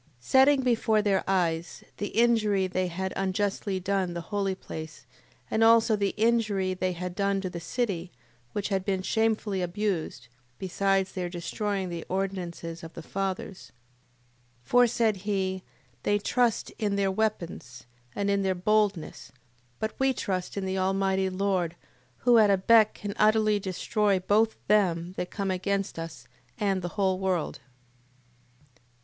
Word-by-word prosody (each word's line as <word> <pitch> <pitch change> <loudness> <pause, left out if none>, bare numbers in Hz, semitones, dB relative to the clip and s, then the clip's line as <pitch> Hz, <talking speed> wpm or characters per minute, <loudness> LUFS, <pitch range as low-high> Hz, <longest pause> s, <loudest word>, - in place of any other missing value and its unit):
Setting 265 - +4
before 225 -3 +2
their 195 -2 +2
eyes 170 -3 0
the 205 - -2
injury 215 -4 +2
they 185 0 -1
had 190 +2 -3
unjustly 195 0 -1
done 185 -2 -1
the 170 - -3
holy 195 -2 0
place, 155 -6 -9 0.5
and 220 - +2
also 225 0 +5
the 200 -1 -1
injury 215 -4 +2
they 185 0 -1
had 180 +1 -5
done 200 +1 0
to 185 -2 -4
the 170 - -5
city, 180 -1 -2 0.4
which 205 -1 -3
had 195 -2 0
been 190 -1 -1
shamefully 220 -3 0
abused, 175 -7 -2 0.3
besides 195 0 0
their 180 -2 -3
destroying 190 +3 -3
the 170 -1 -5
ordinances 180 -3 -4
of 165 - -9
the 165 - -8
fathers. 195 +1 -4 0.9
8:18. - - -29
For, 245 0 +5
said 225 -2 +1
he, 190 -1 -2 0.4
they 205 - +2
trust 235 +2 0
in 205 -2 0
their 195 -1 +1
weapons, 185 - -3 0.3
and 200 - -1
in 200 0 +2
their 190 -1 +1
boldness: 195 - 0 0.5
but 220 - -3
we 265 0 +3
trust 185 -5 -3
in 195 - -2
the 190 0 -1
Almighty 190 0 +1
Lord, 185 -3 -1 0.5
who 240 -2 +6
at 210 -2 +5
a 195 - +4
beck 215 +3 +5
can 205 -1 -5
utterly 215 -1 +4
destroy 200 +2 0
both 215 +4 +2
them 180 -4 +2
that 180 - -3
come 195 -2 -2
against 195 -1 -2
us, 155 -8 -8 0.3
and 195 -2 0
the 175 - -3
whole 190 -2 +1
world. 185 -7 -1
195 Hz, 150 wpm, -27 LUFS, 185-210 Hz, 0.9 s, who